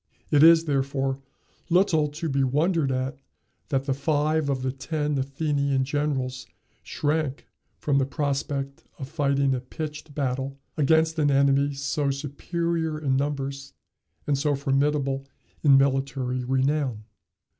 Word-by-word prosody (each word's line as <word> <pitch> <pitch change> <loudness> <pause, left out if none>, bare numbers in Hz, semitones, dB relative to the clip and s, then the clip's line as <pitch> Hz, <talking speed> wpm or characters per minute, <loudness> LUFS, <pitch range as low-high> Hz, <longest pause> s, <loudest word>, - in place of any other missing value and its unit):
It 145 - +5
is, 165 +1 +7
therefore, 135 -2 -1 0.5
little 165 -4 +3
to 150 +3 -5
be 140 -2 +1
wondered 150 +2 +1
at 130 +1 -2 0.5
that 135 -2 0
five 150 +1 +1
of 130 -2 -1
the 130 - 0
ten 150 +2 -2
Athenian 140 0 0
generals 135 -2 -2 0.3
shrank 150 -2 -2 0.3
from 140 -2 +1
the 135 - +2
prospect 140 -1 -2
of 135 - -6
fighting 140 -2 +1
a 130 - -1
pitched 150 +2 -7
battle 135 0 -2 0.2
against 160 +2 +3
an 145 -1 +3
enemy 140 0 +3
so 140 +1 -1
superior 160 +3 -2
in 140 -4 0
numbers 140 0 -3 0.5
and 145 - +1
so 145 0 +1
formidable 135 0 0 0.3
in 140 -3 +6
military 135 -2 0
renown. 130 -2 0
140 Hz, 125 wpm, -25 LUFS, 135-150 Hz, 0.5 s, is